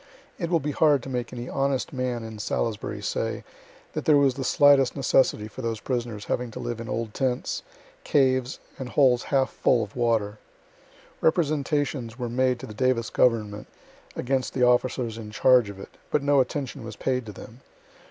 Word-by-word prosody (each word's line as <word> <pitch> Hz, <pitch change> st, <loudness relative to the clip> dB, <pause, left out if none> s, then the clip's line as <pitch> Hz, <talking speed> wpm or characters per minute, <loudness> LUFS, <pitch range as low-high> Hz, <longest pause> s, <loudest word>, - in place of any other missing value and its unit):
It 170 Hz, -3 st, -2 dB
will 170 Hz, -2 st, +3 dB
be 150 Hz, 0 st, -3 dB
hard 145 Hz, -3 st, +3 dB
to 135 Hz, -, -7 dB
make 125 Hz, -2 st, -3 dB
any 120 Hz, 0 st, -6 dB
honest 135 Hz, 0 st, -1 dB
man 125 Hz, -3 st, -2 dB
in 110 Hz, -1 st, -8 dB
Salisbury 110 Hz, 0 st, -3 dB
say -, -, -2 dB, 0.5 s
that -, -, -4 dB
there 150 Hz, -2 st, +6 dB
was 140 Hz, -2 st, +4 dB
the 135 Hz, +1 st, -5 dB
slightest 140 Hz, -1 st, +4 dB
necessity 130 Hz, -5 st, +2 dB
for 130 Hz, -, -9 dB
those 115 Hz, -2 st, -2 dB
prisoners 120 Hz, -4 st, -3 dB
having 125 Hz, -1 st, -2 dB
to 110 Hz, -, -8 dB
live 120 Hz, -1 st, -4 dB
in 115 Hz, -, -7 dB
old 115 Hz, -4 st, -3 dB
tents, 130 Hz, -2 st, -1 dB, 0.4 s
caves 130 Hz, -2 st, +2 dB, 0.2 s
and 130 Hz, -2 st, -5 dB
holes 125 Hz, -3 st, +4 dB
half 135 Hz, -2 st, +1 dB
full 115 Hz, -, +2 dB
of 105 Hz, -, -10 dB
water. 110 Hz, -4 st, 0 dB, 0.8 s
Representations 145 Hz, -6 st, 0 dB
were 120 Hz, -2 st, -3 dB
made 130 Hz, +1 st, +1 dB
to -, -, -7 dB
the 110 Hz, -, -9 dB
Davis 125 Hz, 0 st, 0 dB
government 105 Hz, -4 st, +1 dB, 0.5 s
against 130 Hz, 0 st, -1 dB
the 125 Hz, -, +2 dB
officers 125 Hz, -2 st, +1 dB
in 110 Hz, -1 st, -8 dB
charge 120 Hz, +1 st, +4 dB
of 100 Hz, -1 st, -9 dB
it, -, -, -9 dB, 0.2 s
but 150 Hz, -, +1 dB
no 145 Hz, 0 st, +4 dB
attention 135 Hz, 0 st, -2 dB
was 115 Hz, -2 st, -7 dB
paid 125 Hz, +1 st, -2 dB
to -, -, -6 dB
them. 110 Hz, +4 st, -12 dB
125 Hz, 180 wpm, -25 LUFS, 115-135 Hz, 0.8 s, there